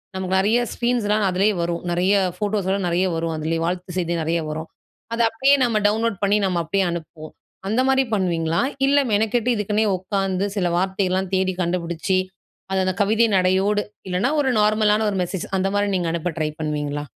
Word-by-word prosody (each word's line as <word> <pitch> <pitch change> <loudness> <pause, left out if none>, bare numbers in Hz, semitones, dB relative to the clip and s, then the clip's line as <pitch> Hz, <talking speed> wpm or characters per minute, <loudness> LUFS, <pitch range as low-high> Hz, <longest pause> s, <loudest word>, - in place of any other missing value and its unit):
நமக்கு 190 0 -1
நெறைய 215 +5 +3 0.2
ஸ்கிரீன்ஸ்லாம் 215 -4 0
அதிலேயே 195 +4 +2
வரும். 170 0 -2
நெறைய 185 +4 +2 0.2
ஃபோட்டோஸ்லாம் 200 -2 -1
நெறைய 175 +2 +1
வரும் 165 0 -2
அதிலேயே. 165 +1 -2
வாழ்த்து 180 0 -4
செய்தி 170 -1 -1
நெறைய 165 +1 0
வரும். 160 +1 -5 0.5
அதை 230 0 +1
அப்படியே 270 +5 +3
நம்ம 225 -3 +2
டவுன்லோட் 220 -1 0
பண்ணி, 200 +1 +3
நம்ம 180 -2 0
அப்படியே 195 +4 0
அனுப்புவோம். 160 -2 -8 0.3
அந்தமாரி 265 +4 +2
பண்ணுவீங்களா? 170 -3 0 0.3
இல்லை, 285 0 +4
மெனக்கெட்டு 225 +3 +1
இதுக்குனே 210 +1 0
உட்காந்து, 195 0 -1
சில 180 -2 +1
வார்த்தைலாம் 190 0 -1
தேடி 185 0 +1
கண்டுபுடிச்சு, 170 +1 -1 0.6
அது 190 - +2
அத 185 - 0
கவிதை 220 +3 +3
நடையோடு, 190 +3 +2 0.3
இல்லைனா 190 +10 0
ஒரு 265 -2 +1
நார்மலான 215 0 +3
ஒரு 195 - -2
மெசேஜ் 180 0 -4
அந்த 190 +1 0
மாரி 205 0 +1
நீங்க 175 -2 0
அனுப்ப 170 +1 -2
ட்ரை 155 -1 0
பண்ணுவீங்களா? 150 -1 -2
190 Hz, 165 wpm, -22 LUFS, 175-210 Hz, 0.6 s, இல்லை